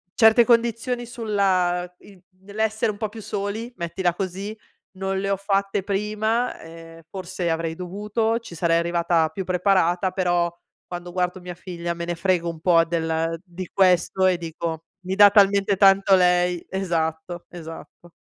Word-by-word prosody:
certe 225 +1 +6
condizioni 235 +1 +1
sulla 190 -6 0
in 195 -3 -17 0.2
nell'essere 220 +2 -1
un 205 - -11
po' 215 -1 -3
più 220 0 -10
soli, 210 +4 -4
mettila 175 +1 -1
così, 195 +3 -5 0.4
non 190 0 -2
le 195 0 -2
ho - - +3
fatte 195 0 0
prima, 215 +4 -1
ehm, 165 0 -12
forse 185 -2 -4
avrei 165 0 -2
dovuto, 210 +5 -2
ci 175 -7 -11
sarei 165 0 +2
arrivata 170 -1 +1
più 190 - -5
preparata, 185 0 +2
però 175 -2 +1 0.4
quando 175 0 -7
guardo 180 0 -2
mia 180 -1 -7
figlia 175 -1 -5
me 170 0 -5
ne 175 0 -3
frego 170 -1 0
un 165 -1 -8
po' 165 -1 +4
del 165 0 -1
di 180 0 -8
questo 185 0 +3
e 180 -2 +2
dico 165 -1 -5 0.2
mi 190 - -2
dà 205 0 +8
talmente 200 -1 +4
tanto 195 0 +5
lei 180 -1 +2
esatto, 170 -2 -2
esatto. 170 0 -11
185 Hz, 155 wpm, -23 LUFS, 170-200 Hz, 0.4 s, dà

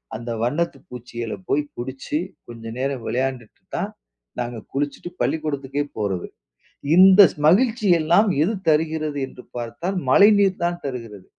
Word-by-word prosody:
அந்த 115 +2 -7
வண்ணத்து 150 +8 -1
பூச்சிகள 120 -2 -6 0.2
போய் 150 - +2
புடிச்சு, 130 +4 -4 0.3
கொஞ்சம் 115 -1 -8
நேரம் 135 -2 -2
விளையாண்டுட்டு 130 -3 -3 0.2
தான் - - -2 0.5
நாங்க 120 -1 -4 0.2
குளிச்சுட்டு, 145 +4 -3
பள்ளிக்கூடத்துக்கே 145 -3 -1
போறது. 100 -4 -2 0.7
இந்த 190 +2 +8
ஸ் - - -21
மகிழ்ச்சியெல்லாம் 200 -3 +3
எது 215 +7 0 0.2
தருகிறது 155 -1 0
என்று 125 - -14
பார்த்தால், 170 +11 -3
மழைநீர் 200 +2 +5
தான் 175 0 -1
தருகிறது. 115 -7 -7
140 Hz, 120 wpm, -22 LUFS, 120-175 Hz, 0.7 s, இந்த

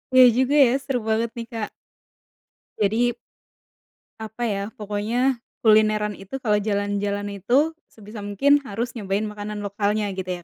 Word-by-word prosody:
Iya 255 - +10
juga 260 +2 +2
ya, 240 - +2
seru 265 -3 -1
banget 220 +1 +1
nih 230 - -4
Kak. 220 -2 -3 1.1
Jadi 225 +4 +2 1.1
apa 220 +2 -6
ya, 200 -3 -1
pokoknya, 225 +5 -1 0.2
kulineran 215 -1 +4
itu 205 +7 -8
kalau 210 -2 +3
jalan-jalan 205 0 -2
itu, 270 - +2 0.2
sebisa 210 0 -11
mungkin 240 +9 +3
harus 235 +4 -3
nyobain 205 -2 -2
makanan 210 0 -5
lokalnya 205 0 -1
gitu 185 -2 -5
210 Hz, 130 wpm, -23 LUFS, 205-235 Hz, 1.1 s, Iya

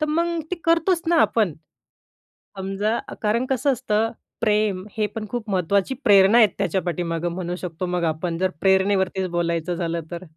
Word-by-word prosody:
तर 305 - +1
मग 335 +1 0
ते 365 - -1
करतोच 335 +1 +2
ना 340 - +3
आपण. 205 -9 +1 1.0
समजा 195 +4 -1
अ, - - -7
कारण 230 +4 +1
कसं 265 +2 +2
असतं, 225 -2 0 0.3
प्रेम 210 -3 +1
हे 210 -1 +1
पण 215 -1 -4
खूप 235 -3 -4
महत्त्वाची 195 +5 +1
प्रेरणा 200 +1 +6
आहेत 220 -4 +7
त्याच्या 190 -1 0
पाठीमागं 175 -1 -2
म्हणू 175 0 -4
शकतो 180 0 -5
मग 175 -1 -2
आपण. 165 +1 -4
जर 185 +1 +1
प्रेरणेवरतीच 190 -1 +2
बोलायचं 170 0 -1
झालं 170 -1 -2
तर. 175 +1 -6
195 Hz, 170 wpm, -23 LUFS, 175-225 Hz, 1.0 s, आहेत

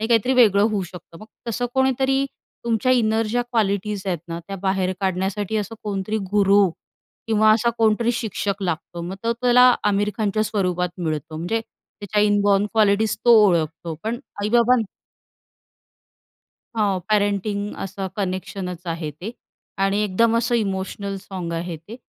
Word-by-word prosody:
हे 220 - -1
काहीतरी 235 +2 +3
वेगळं 215 -6 +5
होऊ 205 -2 -1
शकतं. 175 -2 -11
मग 215 - -11 0.2
तसं 240 +2 -1
कोणीतरी 265 +1 +2 0.4
तुमच्या 235 +2 +2
इनर 225 -2 +2
ज्या 245 +3 0
क्वालिटीज 205 -2 0
आहेत 180 -3 -1
ना, 165 0 -4
त्या 195 - -4
बाहेर 190 -1 +1
काढण्यासाठी 195 +3 -1
असं 210 +1 -3
कोणतरी 205 +1 -2
गुरू 200 -1 +5 0.6
किंवा 215 0 +4
असा 235 +2 +2
कोणतरी 225 +2 +2
शिक्षक 205 -3 -3
लागतो. 170 -1 -3
मग 175 +3 -5
तो 230 - +2
त्याला 250 +1 +5
आमिर 205 0 +2
खानच्या 215 0 +1
स्वरूपात 180 -4 0
मिळतो, 155 -2 -3
म्हणजे 175 +8 -1
त्याच्या 210 -1 -4
इनबॉर्न 205 -1 +3
क्वालिटीज 215 -1 +3
तो 240 - +5 0.2
ओळखतो. 165 -2 -1
पण 230 +2 -2 0.2
आई-बाबा 235 +3 +4 2.0
हो, 200 -4 +1
पॅरेंटिंग 205 0 0
असं 195 0 -5
कनेक्शनच 185 -2 -4
आहे 165 -2 -3
ते 205 - -4 0.5
आणि 195 +1 +1
एकदम 225 +3 +2
असं 235 +1 +1
इमोशनल 195 -2 -2
सॉन्ग 185 -3 -6
आहे 170 0 -4
ते. 170 +9 -11
205 Hz, 145 wpm, -22 LUFS, 190-225 Hz, 2.0 s, वेगळं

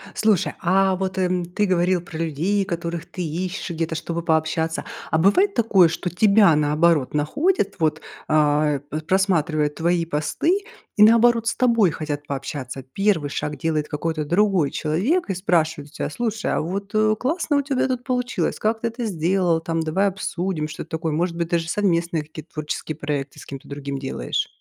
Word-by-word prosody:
Слушай, 215 -5 +2
а 190 +1 +3
вот, 190 0 -3
эм, 180 -1 0
ты 180 +4 -1
говорил 180 -1 +2
про 170 -2 -9
людей, 165 +6 0
которых 170 -1 -4
ты 185 - -7
ищешь 175 +5 -4
где-то, 165 -1 -2
чтобы 170 +1 -3
пообщаться. 160 0 0 0.3
А 160 - +3
бывает 360 - +4
такое, 205 - +5
что 170 +2 -3
тебя, 200 -2 +5
наоборот, 150 -1 +2
находят, 200 - 0
вот, 155 -2 +1 0.3
а, 150 -1 +2
п 145 +2 -6
просматривая 165 -4 +1
твои 170 +3 0
посты, 165 - 0 0.4
и, 210 - +7
наоборот, 230 +1 +5
с 230 - +1
тобой 230 -7 +3
хотят 145 -1 -4
пообщаться? 135 -1 -5
Первый 195 -8 +1
шаг 150 +1 -3
делает 155 -2 -1
какой-то 155 0 -2
другой 180 -2 +2
человек, 205 - 0
и 195 - -1
спрашивает 160 -5 0
у - - -26
тя: - - -3
"Слушай, 225 +4 -2
а - - 0
вот, 195 +5 -4
э, 215 0 +3
классно 310 +2 0
у - - +3
тебя 270 -2 0
тут 255 -2 -2
получилось. 250 -1 -1
Как 220 +1 0
ты 235 - 0
это 230 +1 -4
сделал 175 -2 +1
там, 165 0 -2
давай 160 +6 +1
обсудим?"- 180 -4 -2
что-то 155 +1 -8
такое? 160 -1 -2
Может 170 +2 -1
быть, 170 -1 -2
даже 170 -1 0
совместные 170 -4 0
какие-то 155 +1 -11
творческие 155 +1 -4
проекты 145 -2 -4
с - - -11
кем-то 135 -1 -9
другим 140 -1 -5
делаешь? 130 - -2
170 Hz, 175 wpm, -22 LUFS, 155-200 Hz, 0.4 s, и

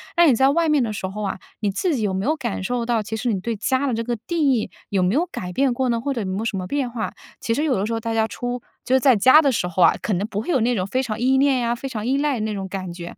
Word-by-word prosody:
那 345 -1 +6
你 275 - +6
在 265 +4 +4
外 330 +3 +2
面 300 -2 +3
的 225 -3 -1
时 195 -2 -4
候 195 +3 -5
啊， 200 - -2 0.2
你 210 - 0
自 295 - 0
己 - - -2
有 200 -2 0
没 190 +1 -2
有 300 - +2
感 235 -9 -3
受 240 +3 -1
到， 230 -2 0
其 220 +2 -4
实 235 0 -1
你 190 - -2
对 230 +2 -3
家 260 +6 0
的 255 - 0
这 230 +1 -2
个 240 0 -1
定 310 -6 +2
义， 225 -4 -1 0.2
有 195 -2 0
没 180 +2 +2
有 315 +7 +2
改 180 - -6
变 265 +6 +1
过 255 +1 0
呢， 235 -1 +1
或 280 +4 -2
者 235 - -3
有 200 - -3
没 190 0 -2
有 220 - -3
什 220 - -1
么 185 -1 -3
变 275 +4 -1
化？ 230 -2 -4 0.3
其 230 - 0
实 290 +6 0
有 275 -5 +2
的 195 - -1
时 225 - -3
候 225 - -1
大 225 0 -3
家 220 -1 +2
出 245 +4 -4 0.2
就 260 - +2
是 - - +5
在 260 -4 +5
家 260 +9 +7
的 280 -3 +2
时 220 -7 -1
候 180 0 +1
啊， - - +6
可 215 - -1
能 190 +2 0
不 205 - -3
会 - - -10
有 275 -9 +2
那 240 +2 +2
种 185 0 -1
非 255 +6 0
常 220 -4 -4
依 260 +2 +3
恋 270 -1 +3
呀， 235 0 0
非 270 +3 -6
常 220 -3 -4
依 270 +2 +2
赖 285 -3 0
那 215 0 -2
种 195 -1 -4
感 185 -2 -5
觉。 170 0 -9
235 Hz, 370 characters per minute, -22 LUFS, 205-265 Hz, 0.3 s, 家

